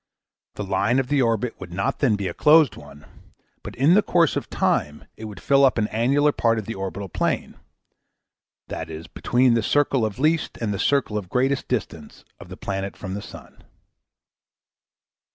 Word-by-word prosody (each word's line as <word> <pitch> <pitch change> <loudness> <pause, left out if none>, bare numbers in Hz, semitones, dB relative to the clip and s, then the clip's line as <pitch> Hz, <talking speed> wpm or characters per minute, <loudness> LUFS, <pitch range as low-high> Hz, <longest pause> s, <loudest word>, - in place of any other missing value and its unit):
The - - -4
line 100 +5 +1
of 135 -1 -1
the 145 -2 +2
orbit 115 0 -1
would 90 -2 -9
not 95 +3 -2
then 125 -7 +3
be 100 -2 -3
a 85 - -4
closed 155 - +5
one 75 -1 -14 0.6
but - - -9
in 140 +7 +4
the 210 - +6
course 170 -5 +2
of - - -4
time 75 0 -1
it 110 - -9
would 105 -3 -9
fill 140 0 +3
up 130 -3 +4
an 105 -1 +1
annular 140 +7 +2
part 115 -4 +1
of 110 - -4
the 115 - -5
orbital 95 0 -5
plane, - - -2 1.1
viz. 80 0 -6
between 125 +9 +1
the 115 - +2
circle 135 +1 +1
of 110 -2 -2
least 155 +3 0
and 110 -3 -2
the 100 - -4
circle 135 -7 +1
of 95 -3 -11
greatest 130 +4 0
distance 80 -11 -5
of - - -12
the 95 - -9
planet 95 0 -4
from 95 -2 -6
the 100 - -4
sun. - - -13
110 Hz, 185 wpm, -23 LUFS, 95-135 Hz, 1.1 s, the